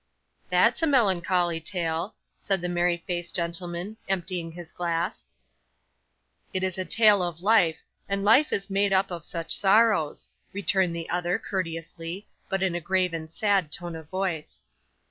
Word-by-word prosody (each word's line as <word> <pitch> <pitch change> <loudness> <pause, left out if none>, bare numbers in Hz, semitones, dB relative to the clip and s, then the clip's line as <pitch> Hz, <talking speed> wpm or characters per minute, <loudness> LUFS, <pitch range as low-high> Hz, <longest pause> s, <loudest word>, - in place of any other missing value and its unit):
'That's - - +3
a 325 - +3
melancholy 185 - +2
tale,' 165 +2 -2 0.2
said 195 -1 -1
the 180 - -3
merry 175 -1 0
faced 175 -1 -3
gentleman, 175 +4 -2
emptying 180 -3 -2
his 170 0 -10
glass. 170 -1 -2 1.2
'It 185 0 -2
is 185 0 -2
a 185 - -2
tale 210 +1 +5
of 175 -1 -4
life, 195 -7 +3 0.3
and 200 0 -1
life 255 +9 +5
is 195 - -1
made 200 0 +1
up 190 0 +2
of 170 -2 -5
such 165 -1 -1
sorrows,' 205 -6 +3 0.3
returned 190 -3 +1
the 165 -1 -5
other, 175 0 0
courteously, 165 0 -5 0.2
but 195 -1 0
in 185 -2 +1
a 175 - -2
grave 185 +1 +1
and 160 -1 -5
sad 195 -2 +1
tone 175 0 -3
of 160 -2 -10
voice. 185 -5 -3
180 Hz, 155 wpm, -26 LUFS, 170-195 Hz, 1.2 s, tale